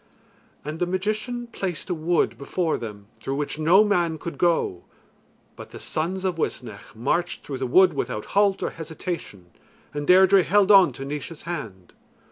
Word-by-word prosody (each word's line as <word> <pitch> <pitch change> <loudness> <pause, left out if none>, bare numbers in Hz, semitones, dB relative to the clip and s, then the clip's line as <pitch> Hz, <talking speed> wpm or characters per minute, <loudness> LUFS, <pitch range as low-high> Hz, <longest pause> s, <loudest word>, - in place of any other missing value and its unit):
And 155 +2 -5
the 180 - 0
magician 215 +6 -2
placed 190 -7 -5
a - - +2
wood 170 +1 0
before 160 +4 -1
them 105 -3 -8
through 135 - -3
which 145 +1 -3
no 175 +7 +6
man 175 -6 +1
could 155 -2 -7
go, 165 - +1 0.7
but - - -10
the - - -10
sons 185 +4 -3
of 180 -3 -1
Uisnech 110 -10 -5
marched 170 +10 -1
through 135 -3 -6
the 130 - -2
wood 185 +9 +5
without 125 -6 -3
halt 200 -1 +3
or - - -1
hesitation, 160 - -7 0.4
and 145 0 -4
Deirdre 190 +1 +6
held 200 +3 +3
on 195 -3 +7
to 135 - -7
Naois's 150 +3 -6
hand. 110 - -7
165 Hz, 165 wpm, -24 LUFS, 140-185 Hz, 0.7 s, on